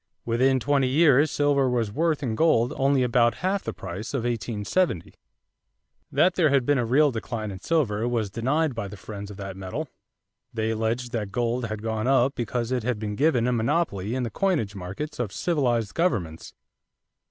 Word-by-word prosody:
Within 130 +3 +2
twenty 140 0 +2
years 145 +1 +4
silver 140 -2 +2
was 115 -4 0
worth 155 +3 0
in 120 -4 -1
gold 120 -3 +3
only 135 -1 +2
about 120 -1 +3
half 195 +1 0
the - - -3
price 95 +8 -6
of 125 - -1
1870. 115 - -1 1.0
That 185 - +3
there 170 -5 +3
had 135 -3 +2
been 145 0 +2
a 120 - 0
real 145 +4 +4
decline 110 -2 -4
in 95 - -8
silver 120 - 0
was 115 -5 -1
denied 135 +7 0
by 115 -4 -4
the 100 - -9
friends 100 +1 -8
of 100 - -9
that 95 -2 -6
metal. 110 +11 -5 0.6
They 110 0 -1
alleged 115 +2 -2
that 105 -5 -3
gold 120 +2 -1
had 110 -1 -5
gone 110 +1 -2
up 135 0 +3
because 120 0 -3
it 125 -1 0
had 120 0 -1
been 105 -1 -4
given 135 -3 +2
a 125 - +2
monopoly 115 - 0
in 130 - -1
the 115 - -3
coinage 155 - 0
markets 100 - -6
of 115 -5 -2
civilized 120 - 0
governments. 100 - -2
120 Hz, 185 wpm, -25 LUFS, 110-140 Hz, 1.0 s, years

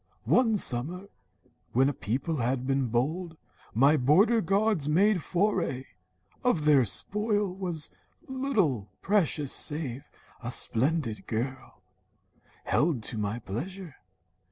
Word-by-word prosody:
"One 225 -4 +3
summer, 175 +7 0 0.6
when 130 +3 +3
a 145 - -1
people 135 - -3
had 125 +1 -1
been 135 -1 0
bold, 160 +9 -2 0.4
My 140 +6 +4
border 195 - +3
guards 195 -4 0
made 190 +4 +3
foray. 175 -8 -1 0.6
Of 180 -12 +1
their 140 -5 +5
spoil 205 - +1
Was 175 -5 -2 0.4
little 205 - -1
precious 160 -8 +1
save 145 -3 0 0.3
a 120 0 -5
splendid 125 -1 +2
girl, 120 -3 -5 0.8
Held 150 -7 0
to 110 - -1
my 105 +2 -2
pleasure. 155 - -7
150 Hz, 110 wpm, -27 LUFS, 125-195 Hz, 0.8 s, their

